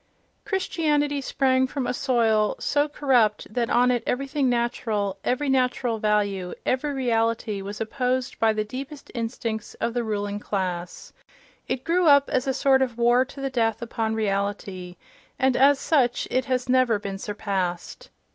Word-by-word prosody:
Christianity 300 -7 0
sprang 260 -1 +1
from 265 0 -3
a - - -1
soil 225 -5 +2
so 290 +1 +1
corrupt 245 -8 +1
that 235 -1 0
on 250 +1 +4
it 245 -2 +1
everything 275 +1 0
natural, 220 -5 -1
every 270 +4 0
natural 250 -3 +1
value, 200 -4 0
every 260 +3 0
reality 230 -5 0
was 200 +2 -7
opposed 250 +2 -2
by 225 -1 +4
the 215 0 -1
deepest 270 +6 -8
instincts 230 -2 -4
of 235 - -2
the 240 -1 -1
ruling 205 -2 -3
class—it 195 - -6
grew 345 +1 +2
up 285 -1 +5
as 260 +2 0
a - - +2
sort 270 -1 +3
of 245 -3 -1
war 240 +1 +4
to 275 +1 -11
the 270 -1 -2
death 225 -3 0
upon 225 -1 -2
reality, 200 -3 -3 0.4
and 265 -1 +2
as 280 +2 +5
such 265 -5 +1
it 255 0 +1
has 255 -2 -1
never 255 -3 +3
been 200 -1 -6
surpassed. 195 -4 -4
245 Hz, 155 wpm, -25 LUFS, 210-265 Hz, 0.4 s, up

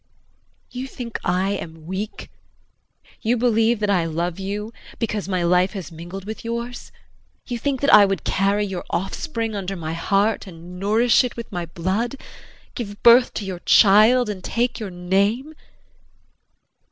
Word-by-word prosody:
You 255 +1 -5
think 240 -3 -6
I 185 +3 +1
am 160 -5 -6
weak; 190 +5 -5 0.9
you 240 +2 +1
believe 230 -1 +2
that 210 - 0
I 180 -4 +2
love 170 +2 -2
you 205 +3 -4 0.2
because 210 -3 -3
my 185 -2 0
life 180 +2 +3
has 190 -7 -6
mingled 175 +4 -8
with 220 +1 -7
yours; 235 +1 -5 0.6
you 240 -2 -3
think 275 0 -1
that 280 - +3
I 210 -1 +9
would 195 -2 -2
carry 200 +2 +1
your 190 -3 -5
offspring 225 - -3
under 195 -1 -3
my 160 -3 -4
heart, 200 +6 0
and 175 0 -10
nourish 225 +6 +3
it 250 - -4
with 235 - -7
my 175 -1 -4
blood 190 +10 -2 0.6
give 205 -4 -7
birth 240 +1 +6
to 205 - -3
your 185 -2 -5
child 215 +6 +5
and 200 -3 -5
take 240 +1 -1
your 215 -3 -5
name! 200 - 0
205 Hz, 155 wpm, -22 LUFS, 180-230 Hz, 0.9 s, I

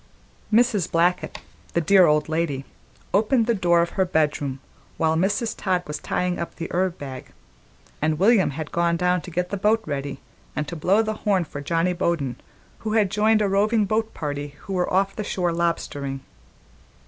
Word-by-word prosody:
Mrs. 215 -5 +3
Blackett, 175 +2 +1 0.4
the - - +2
dear 185 +3 +5
old 150 0 +2
lady, 155 -4 -1 0.5
opened 225 +4 +3
the 235 - +2
door 175 -4 +3
of 170 - -4
her 190 - +1
bedroom 150 -6 0 0.4
while 160 0 +2
Mrs. 205 +7 0
Todd 185 -2 0
was 150 0 -5
tying 180 0 -1
up 170 - -5
the 165 - -5
herb 185 0 0
bag, 130 -3 -8 0.7
and 155 0 +1
William 200 +2 +4
had 150 +2 -6
gone 170 0 +1
down 180 0 +1
to - - -9
get 180 +1 -2
the 200 - -1
boat 215 +3 +2
ready 140 -2 -4 0.4
and 150 +1 -2
to 170 - -5
blow 190 +7 +3
the 215 0 -2
horn 195 -4 +2
for 145 -2 -7
Johnny 165 +4 +1
Bowden, 165 -8 -1 0.4
who 215 -1 -3
had 210 -4 +2
joined 215 +1 +3
a - - +2
roving 210 +2 +2
boat 220 +2 0
party 145 -1 -4
who 195 - -6
were 180 -1 0
off 195 +1 +1
the 210 - -3
shore 180 -3 -1
lobstering. 145 -5 -2
175 Hz, 185 wpm, -24 LUFS, 155-200 Hz, 0.7 s, dear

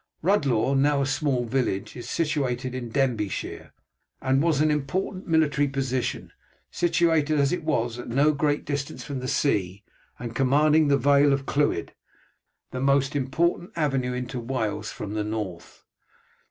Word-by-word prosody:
Rhuddlaw, 140 - +2
now 140 +1 +3
a - - 0
small 135 -2 0
village, 115 -6 -1
is 120 -1 -8
situated 130 -6 -1
in 125 -2 -5
Denbighshire, 115 -6 -2 0.5
and 135 +1 +2
was 160 -3 +2
an 155 0 +3
important 165 +6 -2
military 150 -3 +2
position, 135 -2 -2 0.4
situated 160 -3 +2
as 140 -1 +3
it 180 - -2
was 120 -6 -1
at - - -7
no 140 +5 +3
great 145 0 0
distance 140 -1 -4
from 140 -2 -5
the 130 - -5
sea, 100 -8 0 0.3
and 120 -1 -6
commanding 150 +4 +4
the 140 -1 +4
Vale 140 +1 +4
of 140 0 0
Clwyd, 145 - 0 0.8
the 130 - -4
most 140 +1 +2
important 170 +6 0
avenue 135 -6 0
into 125 0 -4
Wales 115 -3 -3
from 105 0 -6
the 105 -1 -1
north. 105 -5 -6
135 Hz, 150 wpm, -25 LUFS, 125-150 Hz, 0.8 s, commanding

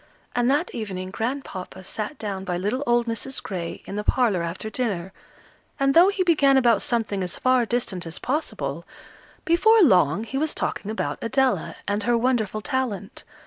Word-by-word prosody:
And 245 0 +2
that 295 +6 +1
evening 190 -4 -5
Grandpapa 220 -6 -5
sat 215 +8 -5
down 200 -4 -4
by 180 -2 -2
little 210 +9 -1
old 240 0 +3
Mrs. 235 +3 -3
Gray 175 -4 -5
in 200 - -6
the 210 - -2
parlour 225 -7 +2
after 170 +5 -4
dinner, 195 -6 -2 0.7
and 275 0 +3
though 340 +4 +7
he 395 -1 +1
began 290 -6 +4
about 235 -5 +4
something 220 -5 0
as 180 - -3
far 255 -2 +2
distant 195 -8 -2
as 165 - -4
possible, 295 +5 -3 0.6
before 425 +6 +5
long 185 - +4
he 265 +4 -3
was 310 +1 -1
talking 205 - -3
about 220 - -3
Adela, 265 +2 +1
and 205 +1 0
her 240 0 +2
wonderful 230 -3 0
talent. 245 -7 -3
230 Hz, 170 wpm, -24 LUFS, 195-265 Hz, 0.7 s, though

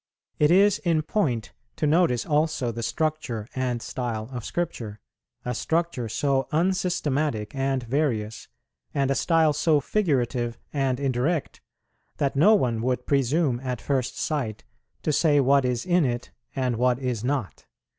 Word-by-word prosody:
It 150 - +5
is 195 +3 +5
in 165 -3 +1
point 140 - -1 0.2
to - - -1
notice 150 -5 +3
also 150 -5 +1
the 115 +1 -5
structure 140 -6 -2
and 125 -2 -2
style 115 -3 -4
of 125 -2 -5
Scripture, 115 -12 -4 0.5
a 125 - -1
structure 160 -3 -1
so 135 +4 0
unsystematic 155 - 0
and 135 -1 -1
various, 115 -4 -1 0.5
and 135 -1 +1
a - - +4
style 160 +1 +3
so 150 +1 +3
figurative 125 - 0 0.2
and 135 -3 0
indirect, 140 +4 -1 0.6
that 140 -1 0
no 205 +10 +6
one 120 - 0
would 125 0 -1
presume 140 -1 +1
at 125 -2 -4
first 130 -3 -1
sight 130 -9 -2 0.4
to 155 - +1
say 145 -1 +4
what 140 0 +4
is 125 -1 -1
in 180 -1 +3
it 120 -2 -2 0.2
and 125 -3 0
what 125 0 +2
is 125 -4 -3
not. 130 - -3
135 Hz, 145 wpm, -25 LUFS, 120-155 Hz, 0.6 s, no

